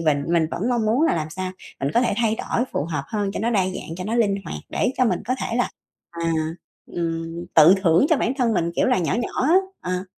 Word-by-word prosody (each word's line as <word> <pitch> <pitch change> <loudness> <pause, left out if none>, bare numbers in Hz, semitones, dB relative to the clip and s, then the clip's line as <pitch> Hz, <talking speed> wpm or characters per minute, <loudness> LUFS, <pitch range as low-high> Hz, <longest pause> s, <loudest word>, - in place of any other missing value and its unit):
mình 145 -3 +1
mình 170 -1 +3
vẫn 205 +8 -2
mong 235 -3 +1
muốn 235 +7 +2
là 325 - +3
làm 155 -1 -3
sao 185 +2 -4 0.3
mình 135 - 0
có 235 - +5
thể 240 - +1
thay 225 -1 +1
đổi 240 - -1
phù - - -1
hợp 150 -3 -3
hơn 205 -2 -1
cho - - -4
nó 230 +3 0
đa 205 -5 +3
dạng, 185 -3 -5
cho 180 - -5
nó 220 - -2
linh 220 -4 +2
hoạt - - -5
để 255 - 0
cho 255 - +4
mình - - 0
có 255 - +1
thể 230 - -2
là, 245 - +1 0.4
à, 170 -1 -2 0.5
ừm, 165 0 -4
tự 160 +4 +8
thưởng 170 - +4
cho 320 - +5
bản 250 -1 0
thân 240 -3 +2
mình 170 -1 0
kiểu - - +3
là 250 -4 +3
nhỏ 170 - 0
nhỏ 240 +1 -2
á, 315 +6 +4 0.3
ờ. 180 +1 -3
185 Hz, 260 wpm, -23 LUFS, 165-235 Hz, 0.5 s, tự